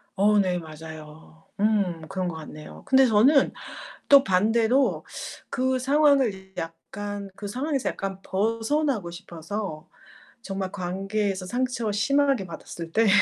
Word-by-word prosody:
어 210 Hz, +2 st, +4 dB
네. 180 Hz, -3 st, +2 dB
맞아요. 160 Hz, 0 st, -11 dB, 0.2 s
음 200 Hz, -6 st, +1 dB
그런 185 Hz, +1 st, -2 dB
것 170 Hz, -, -4 dB
같네요. 155 Hz, -1 st, -10 dB
그런데 265 Hz, -1 st, +5 dB
저는 260 Hz, +7 st, +5 dB, 0.6 s
또 280 Hz, -1 st, +8 dB
반대로 225 Hz, +7 st, +2 dB, 0.4 s
그 260 Hz, 0 st, 0 dB
상황을 265 Hz, -9 st, +2 dB
약간 200 Hz, +5 st, -6 dB
그 205 Hz, -, -6 dB
상황에서 270 Hz, +5 st, -2 dB
약간 195 Hz, -1 st, -5 dB
벗어나고 225 Hz, -, 0 dB
싶어서 170 Hz, 0 st, -6 dB, 0.5 s
정말 195 Hz, -3 st, -4 dB
관계에서 195 Hz, +1 st, -2 dB
상처 240 Hz, 0 st, -1 dB
심하게 275 Hz, +1 st, +2 dB
받았을 165 Hz, -1 st, -8 dB
때 225 Hz, -1 st, +4 dB
205 Hz, 255 characters per minute, -25 LUFS, 180-250 Hz, 0.6 s, 또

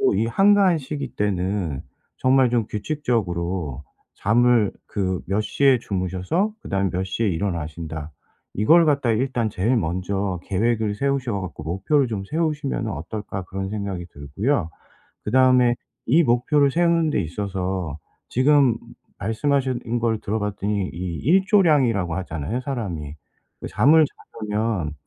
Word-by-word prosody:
이 -, -, +1 dB
한가한 195 Hz, -, +4 dB
시기 145 Hz, +1 st, -6 dB
때는 95 Hz, -6 st, -1 dB, 0.4 s
정말 130 Hz, -1 st, +4 dB
좀 115 Hz, -3 st, +1 dB
규칙적으로 95 Hz, -, -2 dB, 0.3 s
잠을 115 Hz, 0 st, +3 dB, 0.2 s
그 95 Hz, -3 st, -2 dB
몇 100 Hz, +3 st, 0 dB
시에 135 Hz, +3 st, +3 dB
주무셔서 95 Hz, -, -1 dB
그다음에 95 Hz, 0 st, -1 dB
몇 90 Hz, +2 st, -1 dB
시에 105 Hz, +4 st, -1 dB
일어나신다. 80 Hz, -3 st, -4 dB, 0.4 s
이걸 165 Hz, -, +5 dB
갖다가 140 Hz, -6 st, +2 dB
일단 120 Hz, -2 st, 0 dB
제일 110 Hz, +7 st, +1 dB
먼저 95 Hz, +1 st, -2 dB
'계획을 110 Hz, +1 st, 0 dB
세우셔 130 Hz, -3 st, -1 dB
갖고 90 Hz, -4 st, -7 dB
목표를 95 Hz, -, +1 dB
좀 105 Hz, -4 st, -3 dB
세우시면은 150 Hz, -5 st, -2 dB
어떨까?' 95 Hz, +4 st, -5 dB
그런 95 Hz, +1 st, -5 dB
생각이 100 Hz, -4 st, -4 dB
들고요. 95 Hz, -, -1 dB, 0.6 s
그다음에 125 Hz, +1 st, +4 dB, 0.3 s
이 155 Hz, +8 st, +5 dB
목표를 140 Hz, +3 st, +3 dB
세우는 170 Hz, 0 st, +2 dB
데 105 Hz, -, +1 dB
있어서 95 Hz, -2 st, -3 dB, 0.3 s
지금 135 Hz, -1 st, +4 dB, 0.4 s
말씀하신 120 Hz, +2 st, -1 dB
걸 115 Hz, -2 st, 0 dB
들어 110 Hz, +2 st, -2 dB
봤더니 105 Hz, -1 st, -2 dB
이 85 Hz, 0 st, -4 dB
일조량이라고 150 Hz, -, +3 dB
하잖아요, 90 Hz, -, -3 dB
사람이. 95 Hz, -, -4 dB, 0.5 s
그 -, -, -5 dB
잠을 155 Hz, +4 st, +5 dB, 0.5 s
자려면 105 Hz, -8 st, -1 dB
105 Hz, 295 characters per minute, -23 LUFS, 95-130 Hz, 0.6 s, 이걸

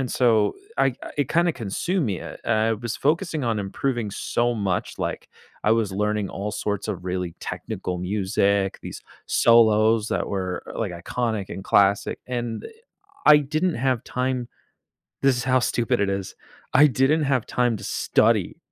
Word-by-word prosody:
and 130 Hz, -, -2 dB
so 115 Hz, -4 st, +3 dB, 0.2 s
I 135 Hz, -, +3 dB, 0.3 s
it 140 Hz, -, +1 dB
kinda 170 Hz, 0 st, +2 dB
consumed 145 Hz, -, -2 dB
me, 95 Hz, -4 st, -3 dB
I -, -, -8 dB, 0.3 s
I -, -, +3 dB
was 115 Hz, +1 st, -4 dB
focusing 160 Hz, 0 st, 0 dB
on 115 Hz, -2 st, 0 dB
improving 110 Hz, +2 st, -2 dB
so 120 Hz, 0 st, 0 dB
much, 100 Hz, -4 st, -2 dB
like, -, -, -4 dB, 0.4 s
I 110 Hz, -, +4 dB
was 115 Hz, -3 st, +1 dB
learning 105 Hz, 0 st, -1 dB
all 105 Hz, +2 st, -4 dB
sorts 105 Hz, -1 st, -2 dB
of 90 Hz, -1 st, -4 dB
really 90 Hz, -2 st, -3 dB
technical 90 Hz, -1 st, -4 dB
music, 95 Hz, +1 st, 0 dB
these -, -, -8 dB, 0.2 s
solos 110 Hz, -1 st, +4 dB
that -, -, -1 dB
were, 95 Hz, -2 st, -3 dB
e -, -, -7 dB
like, 100 Hz, -6 st, -2 dB
iconic 110 Hz, +3 st, -3 dB
and 95 Hz, -, -7 dB
classic, 100 Hz, 0 st, +2 dB
and, 120 Hz, -2 st, -3 dB
eh, -, -, -6 dB, 0.6 s
I 150 Hz, -, +10 dB
didn't 155 Hz, +5 st, -1 dB
have 125 Hz, -1 st, 0 dB
time 125 Hz, -1 st, -2 dB, 0.8 s
this 135 Hz, -2 st, +4 dB
is 120 Hz, -, -3 dB
how 130 Hz, 0 st, +3 dB
stupid 120 Hz, -4 st, 0 dB
it 100 Hz, -, +1 dB
is, 95 Hz, -1 st, -4 dB, 0.4 s
I 145 Hz, +3 st, +8 dB
didn't 140 Hz, +4 st, +2 dB
have 130 Hz, -4 st, +1 dB
time 120 Hz, -2 st, +1 dB
to -, -, -11 dB
study -, -, +1 dB
115 Hz, 165 wpm, -24 LUFS, 100-130 Hz, 0.8 s, I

